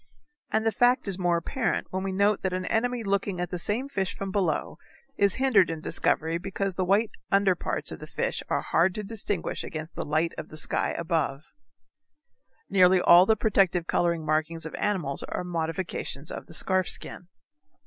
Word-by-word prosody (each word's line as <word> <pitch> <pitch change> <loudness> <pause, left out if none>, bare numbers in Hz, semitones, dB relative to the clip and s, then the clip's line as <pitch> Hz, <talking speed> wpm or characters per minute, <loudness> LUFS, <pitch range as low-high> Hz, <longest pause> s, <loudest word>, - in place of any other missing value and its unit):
And 220 +1 +1
the 225 - +3
fact 245 +3 +3
is 195 -1 0
more 175 -1 +2
apparent 225 +9 -2
when 190 - -2
we 195 0 -3
note 200 +2 +2
that 190 -1 -2
an 185 0 -2
enemy 245 +3 0
looking 195 -2 -1
at 180 - -3
the 180 - -3
same 225 +9 -1
fish 195 -9 -2
from 195 -1 -5
below 185 -6 -1 0.4
is 200 -1 +3
hindered 245 -10 +4
in 165 -1 -4
discovery 160 +1 +1
because 195 +1 -3
the 185 - -1
white 200 +4 +2 0.2
under 195 -1 +4
parts 175 - -1
of - - -7
the - - -9
fish - - -2
are - - 0
hard 175 +2 +1
to 215 - -4
distinguish 205 -3 -2
against 155 0 -7
the - - -4
light 155 +3 0
of - - -8
the 155 - -9
sky - - -1
above. 160 -4 -1 1.2
Nearly 185 -1 +5
all 175 +1 +7
the 220 - +4
protective 195 -5 +2
color 170 0 +1
markings 155 +1 -1
of 160 - -7
animals 180 -10 -1
are - - -3
modifications 165 -3 -3
of - - -7
the 165 - -8
scarf 185 +1 +1
skin. 175 - 0
185 Hz, 190 wpm, -27 LUFS, 165-200 Hz, 1.2 s, all